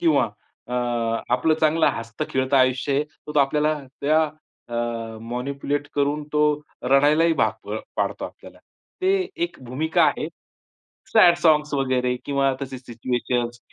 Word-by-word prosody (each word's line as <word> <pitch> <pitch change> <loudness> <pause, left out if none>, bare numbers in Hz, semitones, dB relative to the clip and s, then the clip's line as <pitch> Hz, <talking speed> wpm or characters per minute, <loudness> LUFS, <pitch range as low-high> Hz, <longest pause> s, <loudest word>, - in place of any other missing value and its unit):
किंवा 335 -2 +3 0.4
अ, - - -7 0.6
आपलं 155 +6 +2
चांगलं 160 +1 +3
हसतं 115 -1 -5
खेळतं 130 +1 +1
आयुष्य 130 +1 +2
आहे, 145 +2 +2
तर 150 0 -12
तो - - +4
आपल्याला 150 +2 +2 0.2
त्या 155 +3 +3 0.5
अ, 115 -1 -3
मॅनिप्युलेट 140 +4 -3
करून 145 +1 +1
तो 150 - +1 0.4
रडायलाही 145 +5 +4
भाग - - -1
अ, - - -4 0.2
पाडतो - - -1
आपल्याला. - - -11 0.4
ते 380 +1 +4 0.3
एक 345 - -7
भूमिका 150 +6 +1
आहे, - - +1 0.9
सॅड 175 -6 +7
सांग्स 150 -3 +3
वगैरे 130 -2 +1
किंवा 140 -1 +1
तशी 130 -1 -5
सिच्युएशन्स, 120 0 -2
140 Hz, 135 wpm, -23 LUFS, 125-150 Hz, 0.9 s, सॅड